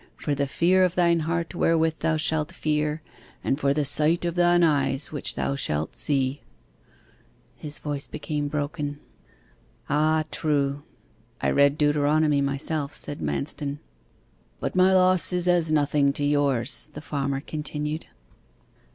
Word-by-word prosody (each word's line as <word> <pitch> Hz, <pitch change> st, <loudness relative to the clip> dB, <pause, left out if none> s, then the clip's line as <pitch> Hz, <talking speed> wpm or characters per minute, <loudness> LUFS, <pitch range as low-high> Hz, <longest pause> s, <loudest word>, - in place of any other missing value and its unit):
for 145 Hz, -, -2 dB
the 140 Hz, 0 st, 0 dB
fear 180 Hz, +6 st, +3 dB
of 180 Hz, -1 st, +1 dB
thine 170 Hz, -1 st, +3 dB
heart 165 Hz, +1 st, -2 dB
wherewith 165 Hz, -2 st, +2 dB
thou 160 Hz, -1 st, +1 dB
shalt 155 Hz, -1 st, -1 dB
fear, 150 Hz, 0 st, -1 dB, 0.4 s
and 135 Hz, -, 0 dB
for 140 Hz, -1 st, +2 dB
the 145 Hz, +1 st, +1 dB
sight 155 Hz, +5 st, +1 dB
of 170 Hz, -, -1 dB
thine 175 Hz, 0 st, +4 dB
eyes 145 Hz, -3 st, +1 dB
which 145 Hz, -, -3 dB
thou 140 Hz, -, -1 dB
shalt 75 Hz, -, -2 dB
see."' 140 Hz, -1 st, -1 dB, 1.1 s
His 150 Hz, -1 st, -8 dB
voice 145 Hz, -2 st, -5 dB
became 150 Hz, -1 st, -3 dB
broken. 145 Hz, 0 st, -3 dB, 0.9 s
'Ah 155 Hz, +2 st, +2 dB
true. 145 Hz, -2 st, 0 dB, 0.6 s
I -, -, 0 dB
read 140 Hz, +1 st, +4 dB
Deuteronomy 150 Hz, 0 st, +2 dB
myself,' 140 Hz, +1 st, -2 dB
said 145 Hz, -, -1 dB
Manston. 145 Hz, 0 st, -3 dB, 0.8 s
'But -, -, -3 dB
my 185 Hz, +1 st, +5 dB
loss 185 Hz, -3 st, +4 dB
is 180 Hz, 0 st, +1 dB
as 175 Hz, -3 st, +3 dB
nothing 145 Hz, -2 st, +2 dB
to 145 Hz, -, -3 dB
yours,' 145 Hz, -3 st, +1 dB
the 150 Hz, -, -6 dB
farmer 140 Hz, -2 st, -2 dB
continued. 150 Hz, +1 st, -4 dB
150 Hz, 140 wpm, -25 LUFS, 145-160 Hz, 1.1 s, my